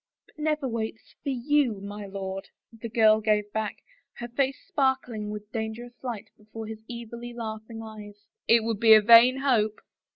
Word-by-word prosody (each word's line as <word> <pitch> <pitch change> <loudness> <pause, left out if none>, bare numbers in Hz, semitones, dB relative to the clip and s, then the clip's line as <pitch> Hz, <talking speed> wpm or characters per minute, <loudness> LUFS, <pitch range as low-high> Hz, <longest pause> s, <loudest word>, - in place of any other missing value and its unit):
" - - -67
But - - -23
never 305 -2 0
waits 225 -2 -5
— - - -62
for - - -4
you, 260 -3 +1
my 205 +1 -7
lord," 195 0 -6 0.2
the 225 0 -7
girl 220 -1 +4
gave 210 -1 +1
back, 220 -1 -3 0.3
her 240 - -7
face 265 +2 0
sparkling 265 -6 -1
with 210 0 -7
dangerous 225 +2 -5
light 230 -4 -5
before 220 +1 -9
his 220 0 -8
evilly 235 0 -7
laughing 225 0 -6
eyes. 210 -2 -11
" - - -61
It 230 -1 +5
would 225 -2 -2
be 220 -1 +8
a 215 - +7
vain 235 +3 +8
hope." 220 -6 +2
225 Hz, 185 wpm, -27 LUFS, 215-240 Hz, 0.3 s, be